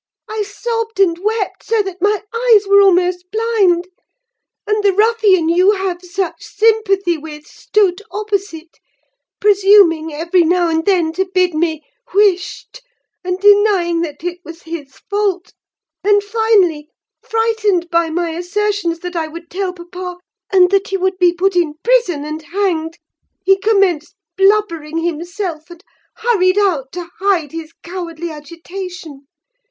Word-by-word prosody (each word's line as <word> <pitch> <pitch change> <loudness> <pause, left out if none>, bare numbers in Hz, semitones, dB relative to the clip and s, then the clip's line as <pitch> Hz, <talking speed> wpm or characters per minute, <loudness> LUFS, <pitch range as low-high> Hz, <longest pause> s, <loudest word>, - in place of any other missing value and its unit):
I 435 0 -3
sobbed 455 +1 -4
and 345 -4 +3
wept 425 +1 -2
so 445 -2 0
that 380 -2 -8
my 415 0 +1
eyes 460 -3 +3
were 400 0 +6
almost 360 -1 +2
blind; 415 -6 +1 0.8
and 420 0 0
the 400 -1 +3
ruffian 415 -5 +3
you 365 +5 +4
have 380 -3 -3
such 360 0 -4
sympathy 400 -5 +1
with 300 -1 -10
stood 400 -2 0
opposite: 395 -6 -4 0.6
presuming 390 -6 +4
every 335 +4 +1
now 345 +1 +2
and 320 0 0
then 345 -5 +2
to 380 +2 -2
bid 365 -2 +2
me 315 -1 -1 0.3
'wisht,' 405 +5 0 0.4
and 365 0 -2
denying 405 -4 +4
that 300 -2 -6
it 355 0 -4
was 335 -1 -11
his 320 -5 -8
fault; 400 -3 -1 0.5
and, 410 0 +3
finally, 405 -8 +1 0.3
frightened 440 -6 0
by 335 -1 +2
my 340 +1 -2
assertions 355 0 -2
that 355 0 -6
I 325 -2 -1
would 335 +2 -11
tell 380 0 -2
papa, 360 0 -8 0.3
and 365 -1 +5
that 395 0 +2
he 390 - -3
should 375 0 -1
be 355 -1 +5
put 370 +2 0
in 330 -4 +1
prison 460 -12 +1
and 310 +1 -5
hanged, 330 -1 -2 0.5
he 390 +1 +5
commenced 385 -6 +1 0.2
blubbering 385 -6 +1
himself, 340 0 -4
and 345 +1 -13 0.3
hurried 415 -5 +1
out 330 -10 +1
to 350 -1 -6
hide 365 -7 +1
his 325 -1 -7
cowardly 340 -2 -6
agitation. 335 -1 -9
365 Hz, 140 wpm, -17 LUFS, 335-410 Hz, 0.8 s, were